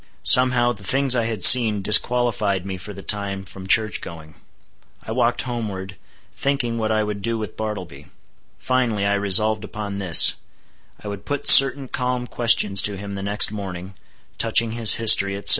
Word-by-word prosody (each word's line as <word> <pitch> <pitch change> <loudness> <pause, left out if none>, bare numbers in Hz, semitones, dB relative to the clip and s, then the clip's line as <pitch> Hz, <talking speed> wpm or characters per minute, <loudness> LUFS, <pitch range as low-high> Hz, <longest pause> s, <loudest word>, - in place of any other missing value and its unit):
Somehow, 125 -1 +3
the 100 -3 -16
things 135 +5 +1
I 120 -2 -2
had 115 -1 -5
seen 110 -5 +6
disqualified 110 -3 +1
me 95 -1 -7
for 90 +3 -11
the 100 -1 -12
time 100 -1 -4
from 95 0 -12
church 110 +1 +1
going. 80 -2 -12 0.7
I - - -10
walked - - -2
homeward, 105 -6 -8 0.4
thinking 130 -5 -4
what 110 0 -3
I 110 0 -1
would 105 -1 -7
do 115 +2 -4
with 110 -2 -9
Bartleby. 90 -10 -9 0.5
Finally, 120 -6 -3
I 100 - -1
resolved 100 +2 0
upon 105 -1 -8
this;—I 95 +3 -1
would 100 -1 -9
put 145 -1 -6
certain 135 0 +7
calm 125 -1 -5
questions 115 -5 0
to 100 -1 -3
him 100 +1 -9
the 100 - -8
next 100 +1 0
morning, 95 -2 -9 0.5
touching 115 0 +1
his 115 -1 +4
history, 100 -3 +2
etc. 100 - +1
105 Hz, 165 wpm, -19 LUFS, 100-120 Hz, 0.7 s, certain